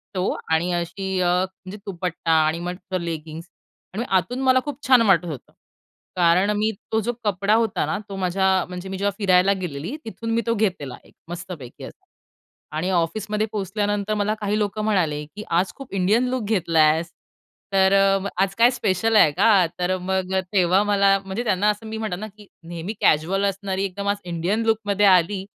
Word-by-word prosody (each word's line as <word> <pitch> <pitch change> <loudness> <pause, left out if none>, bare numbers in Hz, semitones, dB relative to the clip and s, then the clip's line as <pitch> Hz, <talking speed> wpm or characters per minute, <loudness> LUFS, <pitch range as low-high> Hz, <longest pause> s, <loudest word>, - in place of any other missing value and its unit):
तो 185 +1 0 0.2
आणि 170 +3 +1
अशी 185 +2 -3
अ, - - +1
म्हणजे 185 +2 -2
दुपट्टा 175 -3 -3
आणि 160 +2 0
मस्तं 180 +1 -4
लेगिंग्स 165 -1 -6 0.5
आणि 220 +5 -2
आतून 190 +7 0
मला 260 0 +4
खूप 290 -2 -5
छान 255 -3 +6
वाटत 190 -6 +4
होतं. 150 -7 -8 0.6
कारण 180 +3 +3
मी 215 +1 +1 0.2
तो 220 - +2
जो 240 +3 -2
कपडा 200 0 +1
होता 225 -3 +1
ना, - - -2
तो 195 - -6
माझ्या 190 0 +1
म्हणजे 180 +1 -7
मी 190 - -4
जेव्हा 200 +1 0
फिरायला 190 -1 +4
गेलेली, 170 - -5
तिथून 225 0 -5
मी 230 - +2
तो 230 - +2
घेतलेला 185 - -2
एक - - -22 0.2
मस्तपैकी 175 -7 -8
असा - - -12 0.7
आणि 180 +4 -1
ऑफिसमध्ये 210 +5 -1
पोहोचल्यानंतर 205 +1 -2
मला 210 0 0
काही 210 0 -1
लोकं 210 0 -2
म्हणाले 165 -9 0
की, 205 +8 -10
"आज 175 +3 +1
खूप 275 -5 -11
इंडियन 205 +6 +2
लूक 255 -2 -2
घेतलायस. 165 -5 +2 0.6
तर 190 0 +4
अ, 195 0 +3 0.2
आज 195 0 -3
काय 235 +2 +6
स्पेशल 225 -1 0
आहे 155 -8 +6
का?" 195 +3 +4
तर 185 +1 0
मग 190 0 -2 0.2
तेव्हा 185 0 +3
मला 200 -1 +3
म्हणजे 195 +5 -3
त्यांना 210 -2 +2
असं 210 +2 -2
मी 220 0 -5
म्हणातात 205 -5 -3
ना 215 - -4
की 210 -2 -15 0.2
नेहमी 170 +4 -5
कॅज्युअल 185 +6 +2
असणारी, 195 -1 -2
एकदम 200 +1 -5
आज 205 - +1
इंडियन 180 +6 -1
लूकमध्ये 205 -2 +1
आली, 190 +1 +3
195 Hz, 180 wpm, -23 LUFS, 180-210 Hz, 0.7 s, छान